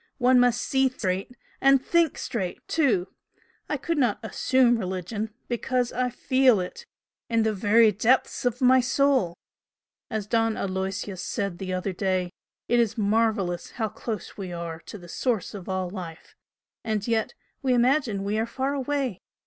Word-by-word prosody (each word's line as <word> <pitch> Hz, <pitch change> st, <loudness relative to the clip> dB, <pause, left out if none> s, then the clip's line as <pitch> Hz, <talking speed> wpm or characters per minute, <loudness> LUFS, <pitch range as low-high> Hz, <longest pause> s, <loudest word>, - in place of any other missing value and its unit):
One 250 Hz, -1 st, +5 dB
must 245 Hz, -1 st, +3 dB
SEE 265 Hz, -1 st, +2 dB
straight, 195 Hz, -1 st, -3 dB, 0.3 s
and 275 Hz, 0 st, +6 dB
THINK 330 Hz, +3 st, +2 dB
straight 190 Hz, -7 st, -4 dB
too! 230 Hz, -, +1 dB, 0.6 s
I -, -, 0 dB
could 335 Hz, -3 st, -2 dB
not 240 Hz, -6 st, +2 dB
'assume' 240 Hz, +1 st, +2 dB
religion, 190 Hz, +3 st, -3 dB, 0.2 s
because 245 Hz, +1 st, -1 dB
I 250 Hz, +1 st, 0 dB
FEEL 255 Hz, -2 st, +3 dB
it 330 Hz, -, -6 dB, 0.4 s
in 230 Hz, -1 st, +2 dB
the 220 Hz, 0 st, +1 dB
very 215 Hz, +3 st, +5 dB
depths 235 Hz, +6 st, +1 dB
of 245 Hz, +1 st, -1 dB
my 260 Hz, 0 st, +6 dB
soul! 260 Hz, -9 st, +2 dB, 0.7 s
As 220 Hz, -4 st, -2 dB
Don 225 Hz, 0 st, +1 dB
Aloysius 190 Hz, 0 st, -3 dB
said 200 Hz, -5 st, -3 dB
the 185 Hz, -1 st, -4 dB
other 185 Hz, +1 st, -2 dB
day, 185 Hz, -1 st, -1 dB, 0.4 s
it 240 Hz, -, +3 dB
is 230 Hz, -1 st, +1 dB
marvellous 210 Hz, -4 st, 0 dB
how 220 Hz, -3 st, -2 dB
close 215 Hz, -2 st, -6 dB
we 190 Hz, -3 st, -5 dB
are 170 Hz, -1 st, -5 dB
to -, -, -7 dB
the 175 Hz, -3 st, -13 dB
Source 225 Hz, 0 st, -1 dB
of 195 Hz, -2 st, -8 dB
all 185 Hz, -1 st, -1 dB
life, 175 Hz, -4 st, -8 dB, 0.5 s
and 215 Hz, -1 st, -2 dB
yet 225 Hz, -2 st, 0 dB, 0.3 s
we 260 Hz, -3 st, +2 dB
imagine 245 Hz, -5 st, +2 dB
we 205 Hz, +2 st, -1 dB
are 225 Hz, -, 0 dB
far 265 Hz, +3 st, -2 dB
away! 275 Hz, -6 st, -2 dB
220 Hz, 160 wpm, -26 LUFS, 190-250 Hz, 0.7 s, and